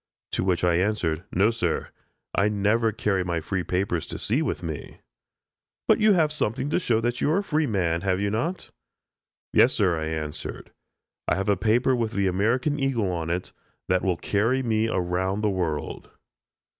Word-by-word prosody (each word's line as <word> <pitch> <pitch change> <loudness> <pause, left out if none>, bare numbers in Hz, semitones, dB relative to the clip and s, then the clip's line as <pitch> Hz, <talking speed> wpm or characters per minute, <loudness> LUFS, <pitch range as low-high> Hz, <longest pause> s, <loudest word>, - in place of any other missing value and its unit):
To - - -1
which 90 -2 +1
I 85 -1 +3
answered: 90 -4 0
"No, 100 +5 +3
sir; 90 -8 -1 0.4
I 100 +2 +2
never 105 +2 +2
carry 100 -3 0
my 85 -2 -1
free 90 +3 -2
papers 90 -1 -1
to - - -5
sea 125 +9 0
with 145 - -2
me." 80 -3 -6 0.9
"But - - +5
you 215 -1 +5
have 160 -5 +3
something 130 0 -1
to - - +2
show 115 -9 +1
that 120 +1 -1
you - - +2
are 160 - +3
a 200 - 0
free 155 -5 0
man, 85 -6 0
have 95 -1 0
you 100 0 0
not?" 165 - -2 0.8
"Yes, 125 - +5
sir," 90 -6 +2
I 80 - -2
answered; 80 -2 -5 0.6
"I - - +2
have 95 +2 -1
a 100 - +4
paper 115 +6 +2
with 115 -2 -1
the 100 -1 +1
American 115 +10 +1
eagle 120 -8 0
on 85 -2 -3
it, 90 +2 -2 0.4
that 95 0 +3
will 90 -3 0
carry 115 +9 +1
me 110 -2 +1
around 95 0 -1
the 105 -1 +1
world." 85 -6 -3
100 Hz, 185 wpm, -25 LUFS, 90-115 Hz, 0.9 s, But